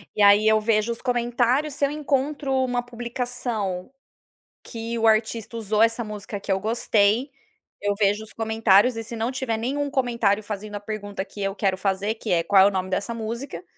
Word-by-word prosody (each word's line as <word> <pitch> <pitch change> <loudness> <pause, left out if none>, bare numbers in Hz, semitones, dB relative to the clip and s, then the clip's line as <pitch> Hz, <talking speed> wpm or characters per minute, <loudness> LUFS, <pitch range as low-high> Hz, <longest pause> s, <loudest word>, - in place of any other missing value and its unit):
E 210 - 0
aí 205 +1 +6
eu 220 0 +4
vejo 215 +1 +1
os 230 - -5
comentários, 245 +3 +1
se 285 - -4
eu - - 0
encontro 285 -1 -1
uma 245 -1 -1
publicação 240 -5 -4 0.7
que 230 0 -5
o 225 - +2
artista 220 +1 +1
usou 215 0 +1
essa 230 +1 +2
música 210 -1 -6
que 195 0 -3
eu 190 - 0
gostei, 220 +3 +2 0.5
eu 205 0 0
vejo 205 +1 +2
os 220 - -12
comentários. 220 +1 +3
E 225 - -3
se 230 +1 -7
não 230 +3 -1
tiver 255 -4 -2
nenhum 280 +5 -2
comentário 235 -6 +1
fazendo 210 0 -6
a 205 - -4
pergunta 205 -2 -5
que 200 +1 -12
eu 195 0 -1
quero 190 -2 0
fazer, 195 +2 -1
que 220 - -6
é: 170 -1 +3
"Qual 195 +2 +5
é - - +7
o 205 - +4
nome 185 -1 -3
dessa 200 +5 -2
música?" 235 +8 -5
220 Hz, 195 wpm, -24 LUFS, 205-240 Hz, 0.7 s, é